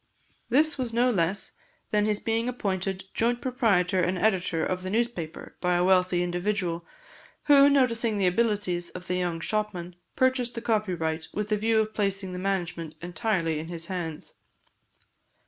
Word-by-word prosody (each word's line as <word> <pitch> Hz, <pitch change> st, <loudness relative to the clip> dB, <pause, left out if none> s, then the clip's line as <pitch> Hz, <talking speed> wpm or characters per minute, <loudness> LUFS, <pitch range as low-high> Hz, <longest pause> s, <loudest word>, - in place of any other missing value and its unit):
This 295 Hz, +4 st, +3 dB
was 245 Hz, -3 st, -2 dB
no 245 Hz, +2 st, +3 dB
less 190 Hz, 0 st, 0 dB, 0.4 s
than 210 Hz, 0 st, +2 dB
his 210 Hz, -1 st, +1 dB
being 230 Hz, +2 st, 0 dB
appointed 195 Hz, -5 st, -2 dB
joint 240 Hz, +1 st, +1 dB
proprietor 205 Hz, -9 st, +2 dB
and 180 Hz, +2 st, 0 dB
editor 180 Hz, -4 st, +1 dB
of 185 Hz, 0 st, -2 dB
the 185 Hz, -, -4 dB
newspaper 215 Hz, -7 st, -3 dB
by 180 Hz, -1 st, +2 dB
a 175 Hz, -, +2 dB
wealthy 185 Hz, -1 st, +3 dB
individual, 175 Hz, -1 st, -2 dB, 0.6 s
who, 285 Hz, -1 st, +7 dB
noticing 235 Hz, -5 st, +2 dB
the 195 Hz, -, +2 dB
abilities 185 Hz, -3 st, +1 dB
of 180 Hz, 0 st, -9 dB
the 180 Hz, -, -2 dB
young 175 Hz, -2 st, -1 dB
shopman, 180 Hz, -2 st, -3 dB, 0.2 s
purchased 260 Hz, -2 st, +1 dB
the 230 Hz, -, -4 dB
copyright 175 Hz, -8 st, -1 dB
with 210 Hz, 0 st, -2 dB
the 215 Hz, -, +3 dB
view 220 Hz, +1 st, +2 dB
of 215 Hz, 0 st, 0 dB
placing 195 Hz, -3 st, -1 dB
the 180 Hz, -, -4 dB
management 175 Hz, -4 st, -2 dB
entirely 175 Hz, -3 st, -1 dB
in 160 Hz, -, -6 dB
his 170 Hz, -1 st, -6 dB
hands. 165 Hz, -4 st, -5 dB
195 Hz, 160 wpm, -27 LUFS, 175-225 Hz, 0.6 s, who